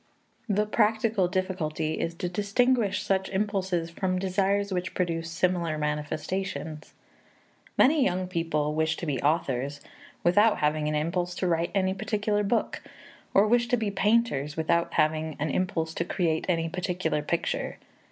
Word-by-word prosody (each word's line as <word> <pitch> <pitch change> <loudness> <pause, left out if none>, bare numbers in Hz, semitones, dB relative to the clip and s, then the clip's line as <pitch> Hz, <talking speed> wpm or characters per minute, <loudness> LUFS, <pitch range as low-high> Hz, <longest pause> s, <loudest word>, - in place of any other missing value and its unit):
The 210 +1 +2
practical 215 -2 +2
difficulty 170 -4 -2
is 165 0 -2
to 180 +1 -3
distinguish 205 +2 +1
such 190 -1 0
impulses 190 -4 -1
from 185 +1 -1
desires 195 +1 0
which 180 0 -3
produce 170 -2 -1
similar 170 -2 0
manifestations. 150 +1 -3 0.8
Many 290 +1 +5
young 185 -2 0
people 165 -4 -1
wish 160 +1 0
to - - -5
be 145 -4 -1
authors 145 -2 0 0.4
without 205 +5 +4
having 150 0 +1
an 150 - 0
impulse 175 +3 -1
to 185 - -1
write 170 0 +1
any 190 -1 +2
particular 210 +1 -1
book, 215 +3 0 0.5
or 200 - +6
wish 235 +2 +3
to 245 0 +2
be 220 -3 -1
painters 195 -9 +1
without 170 +1 +1
having 155 0 +1
an 150 0 -1
impulse 165 -2 -1
to 170 - -1
create 165 -2 -1
any 165 -2 +1
particular 180 -3 -1
picture. 170 +3 -2
180 Hz, 145 wpm, -27 LUFS, 160-200 Hz, 0.8 s, or